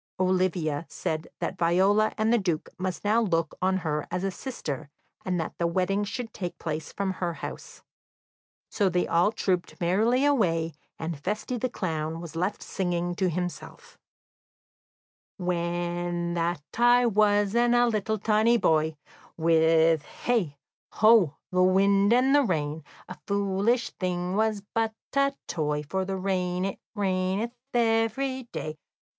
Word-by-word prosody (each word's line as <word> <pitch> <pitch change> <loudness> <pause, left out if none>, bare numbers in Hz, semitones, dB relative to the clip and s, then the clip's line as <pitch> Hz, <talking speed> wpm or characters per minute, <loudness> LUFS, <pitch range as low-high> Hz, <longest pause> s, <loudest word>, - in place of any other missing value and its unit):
Olivia 180 -5 0
said 155 0 -3
that - - -3
Viola 190 +5 +3
and 220 +2 +2
the 240 - +4
Duke 175 -6 -2
must 185 -1 -3
now 215 +3 +3
look 165 -7 0
on 190 +1 +2
her 150 -1 -1
as 180 +1 -3
a 195 - 0
sister, 155 - -5 0.3
and 180 -1 -1
that 160 - -3
the 170 - +2
wedding 190 +4 0
should 225 +2 -5
take 180 -3 -5
place 155 -1 -4
from 200 -1 -2
her 175 -3 -3
house. - - -8 0.9
So 200 -3 +2
they 180 0 +1
all 175 +5 +3
trooped 185 -5 -2
merrily 220 +10 +2
away, 165 - +2 0.2
and 160 -2 -4
Feste, 215 +5 -2
the 255 - -1
clown, 160 -6 -3
was 170 -1 -9
left 185 +5 -2
singing 175 -2 -2
to 190 -2 +1
himself: 180 - -6 1.4
"When 175 -1 -2
that 170 -2 -1 0.2
I 245 +1 +5
was 205 -2 +3
and 240 +1 +3
a 240 0 +5
little 220 -1 0
tiny 220 +3 +3
boy, 160 -5 +2 0.4
With 160 -1 +4
hey, 180 -7 -2 0.4
ho, 215 -9 +5 0.2
the 180 0 +2
wind 195 +2 +4
and 255 +3 +4
the 290 - +6
rain, 155 - -1 0.2
A 180 - -9
foolish 200 +4 +1
thing 180 -1 -2
was 215 -1 +1
but 225 -1 0 0.2
a 275 0 +2
toy, 150 -2 -1
For 190 +6 -2
the 190 0 -3
rain 185 -1 -1
it 195 - -4 0.2
raineth 195 +3 0 0.2
every 235 +3 +1
day. 155 0 -5
185 Hz, 145 wpm, -27 LUFS, 170-215 Hz, 1.4 s, the